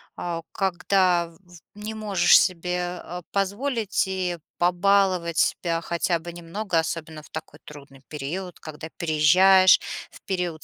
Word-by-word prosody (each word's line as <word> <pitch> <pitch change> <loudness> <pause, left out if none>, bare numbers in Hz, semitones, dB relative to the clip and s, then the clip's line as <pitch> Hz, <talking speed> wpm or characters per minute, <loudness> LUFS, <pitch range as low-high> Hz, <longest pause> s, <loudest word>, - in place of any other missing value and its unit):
а, 170 -1 -4
когда, 185 -2 +1
в 165 0 -19
в 175 -3 -18 0.2
не 215 +1 -5
можешь 205 -5 +4
себе, 180 0 -2
э, 180 +1 -7
позволить 205 +2 -1
и 180 -3 -2 0.2
побаловать 180 -1 +2
себя 165 -2 +1
хотя 170 0 0
бы 170 +1 -9
немного, 175 +1 -2
особенно 160 -1 -4
в - - -18
такой 155 -1 -8
трудный 140 -2 -13
период, 165 +5 -6
когда 155 +1 -9
переезжаешь, 185 +4 +5 0.3
в - - -15
период 180 -4 -3
175 Hz, 135 wpm, -24 LUFS, 165-190 Hz, 0.3 s, переезжаешь